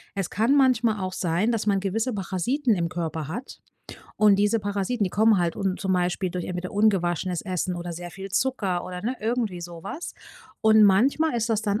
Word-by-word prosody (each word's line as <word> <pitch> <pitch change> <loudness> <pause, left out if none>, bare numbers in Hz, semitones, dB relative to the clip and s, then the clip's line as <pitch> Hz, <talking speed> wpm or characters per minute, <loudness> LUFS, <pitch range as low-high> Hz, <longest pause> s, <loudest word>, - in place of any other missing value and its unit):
Es 195 -3 -2
kann 225 +8 +2
manchmal 240 -6 +3
auch 185 0 -3
sein, 180 +6 0
dass 225 -3 -1
man 200 -2 +3
gewisse 220 +6 -1
Parasiten 215 - 0
im 170 -2 -1
Körper 160 -3 -4
hat. 235 - -7 0.6
Und 210 -2 +5
diese 205 +3 +2
Parasiten, 205 +2 -1
die 185 - -2
kommen 220 0 +4
halt 170 -1 0
und 190 -2 -2
zum 190 -2 0
Beispiel 180 0 0
durch 180 -1 -4
entweder 180 0 -5
ungewaschenes 185 -4 +1
Essen 185 -1 -2
oder 175 0 -5
sehr 175 +1 -7
viel 195 +2 -8
Zucker 200 -6 0
oder, 180 0 -7
ne, 250 +4 -2
irgendwie 220 -5 -1
sowas. 175 - -7 0.5
Und 220 0 +6
manchmal 250 +10 +4
ist 230 0 -1
das 220 -1 0
dann 205 0 0
195 Hz, 195 wpm, -25 LUFS, 180-225 Hz, 0.6 s, Und